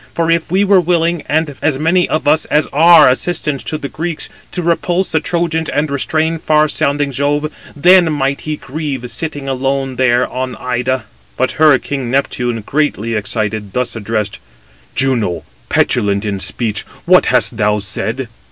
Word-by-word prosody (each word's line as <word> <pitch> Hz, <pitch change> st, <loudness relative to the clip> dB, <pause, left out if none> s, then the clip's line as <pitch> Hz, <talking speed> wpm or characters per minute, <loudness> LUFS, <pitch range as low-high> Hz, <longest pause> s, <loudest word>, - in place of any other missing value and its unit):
For 165 Hz, 0 st, +1 dB
if 165 Hz, -1 st, 0 dB
we 190 Hz, +2 st, +3 dB
were 195 Hz, -2 st, +4 dB
willing, 170 Hz, -1 st, +1 dB
as 150 Hz, -2 st, 0 dB
many 170 Hz, +5 st, +2 dB
of 155 Hz, -, -1 dB
us 150 Hz, +2 st, +3 dB
as 150 Hz, 0 st, +2 dB
are 160 Hz, +1 st, +7 dB
assistants 140 Hz, +1 st, 0 dB
to 155 Hz, -, -2 dB
the 140 Hz, -, -5 dB
Greeks, 160 Hz, +2 st, -4 dB, 0.2 s
to 180 Hz, -, -3 dB
repulse 175 Hz, +2 st, 0 dB
the 160 Hz, -, +2 dB
Trojans 165 Hz, 0 st, -1 dB
and 145 Hz, 0 st, -1 dB
restrain 160 Hz, +4 st, 0 dB
far 155 Hz, 0 st, +3 dB
sounding 145 Hz, -1 st, 0 dB
Jove, 145 Hz, +3 st, -1 dB, 0.2 s
then 175 Hz, +2 st, +5 dB
might 140 Hz, -2 st, -1 dB
he 155 Hz, -1 st, -4 dB
grieve 135 Hz, -4 st, -5 dB
sitting 145 Hz, -4 st, -4 dB
alone 135 Hz, 0 st, -2 dB
there 125 Hz, -1 st, +2 dB
on 130 Hz, 0 st, -4 dB
Ida." 125 Hz, 0 st, -2 dB, 0.3 s
But 130 Hz, -, +1 dB
her 155 Hz, -4 st, +7 dB
king 135 Hz, -2 st, -4 dB
Neptune, 120 Hz, -3 st, -1 dB
greatly 135 Hz, -7 st, -1 dB
excited, 105 Hz, -1 st, -2 dB
thus 125 Hz, -1 st, -1 dB
addressed: 105 Hz, -2 st, -3 dB, 0.6 s
"Juno, 115 Hz, -11 st, 0 dB, 0.3 s
petulant 100 Hz, -1 st, +1 dB
270 -, -, -3 dB
in 100 Hz, -1 st, -3 dB
speech, 105 Hz, +3 st, -2 dB, 0.2 s
what 180 Hz, +1 st, +5 dB
hast 125 Hz, -2 st, +1 dB
thou 105 Hz, -1 st, +2 dB
said? 110 Hz, +5 st, -3 dB
140 Hz, 160 wpm, -15 LUFS, 125-160 Hz, 0.6 s, are